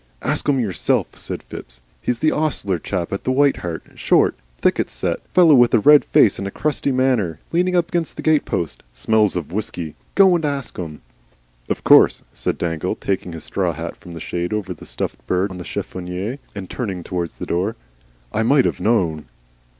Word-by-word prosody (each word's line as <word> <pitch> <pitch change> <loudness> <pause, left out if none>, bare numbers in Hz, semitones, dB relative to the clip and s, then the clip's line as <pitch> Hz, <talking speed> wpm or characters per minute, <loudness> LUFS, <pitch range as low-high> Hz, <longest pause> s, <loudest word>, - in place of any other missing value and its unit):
"Ask - - 0
him 135 -2 +3
yourself," 100 -8 0
said - - -6
Phipps. - - -8 0.2
"He's 120 +2 -2
an 155 - +4
ostler 120 - -1
chap 90 0 -3
in 100 - -1
the 130 - 0
White 140 +1 +3
Hart, 85 -2 -5
short, - - +3 0.2
thick - - +2
set - - -2
fellow, 170 -4 +6
with 120 -3 +6
a - - +5
red 150 +6 +7
face 105 - +4
and 100 - -3
a - - -2
crusty 145 +5 -1
manner. 125 -11 +1
Leaning 180 +2 +2
up 175 -1 +2
against 170 -2 -2
the - - -5
stable 155 -2 +2
door. 85 - 0 0.3
Smells 110 - +2
of 85 -3 -4
whiskey. 90 -6 -4 0.2
Go 190 -2 +6
and 170 - -1
ask 140 -5 -2
him." 80 -5 -6 0.7
"Of - - -2
course," - - +6
said - - -2
Dangle, 80 -2 -2
taking 95 -3 -3
his 80 -2 -8
straw 90 -4 -1
hat 80 +2 -6
from 85 - -12
the 85 - -7
shade 85 +4 -3
over 100 -4 -2
the 80 - -13
stuffed - - -4
bird 95 +2 +1
on 90 - -7
the - - -5
chiffonier 90 +10 -5 0.2
and 95 -2 -6
turning 95 -7 -4
towards 85 -2 -4
the - - -5
door. 95 +6 -1 0.6
"I 110 - +1
might 135 +4 +4
have - - -1
known." 90 -7 +1
100 Hz, 195 wpm, -21 LUFS, 85-135 Hz, 0.7 s, red